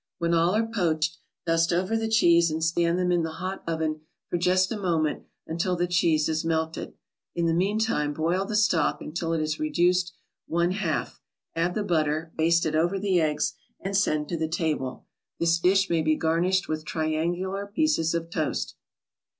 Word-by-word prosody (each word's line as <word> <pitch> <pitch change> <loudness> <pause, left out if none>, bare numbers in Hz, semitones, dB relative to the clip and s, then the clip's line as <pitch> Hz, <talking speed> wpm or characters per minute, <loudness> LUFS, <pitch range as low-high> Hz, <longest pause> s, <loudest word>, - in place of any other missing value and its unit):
When 170 -1 0
all 170 +3 +3
are 225 +1 +2
poached, 170 -7 -1 0.3
dust 165 0 +2
over 185 +5 0
the 225 0 0
cheese 170 -6 +5
and 160 +1 -2
stand 170 +1 +1
them 180 -1 +1
in 175 -1 +2
the 160 -1 -3
hot 185 +4 -5
oven 160 -2 -1 0.3
for - - +1
just 185 +2 +2
a 220 - -3
moment 165 -5 0 0.2
until 170 +3 -1
the 175 0 0
cheese 165 -3 +2
is 155 0 -1
melted. 160 0 -2 0.4
In 170 - 0
the 165 - +2
meantime 195 -4 +1
boil 165 +5 0
the 210 - -3
stock 210 -7 +2
until 165 +1 -4
it 165 - 0
is 155 0 -2
reduced 175 +3 +2 0.4
one 170 +2 +1
half, 185 -5 -2 0.3
add 170 +2 0
the 215 - 0
butter, 160 -3 0
baste 165 +1 +3
it 160 - -1
over 170 +5 +1
the 190 -3 +1
eggs 150 -1 0 0.3
and 195 +1 -4
send 155 -6 +1
to 170 - -2
the 160 0 -1
table. 155 -6 -2 0.3
This 165 0 +2
dish 195 +3 +3
may 165 -3 +1
be 155 0 +2
garnished 170 +4 +1
with 155 0 -3
triangular 175 +6 -2
pieces 200 - +1
of 165 0 -3
toast. 155 -3 -2
170 Hz, 185 wpm, -26 LUFS, 160-185 Hz, 0.4 s, cheese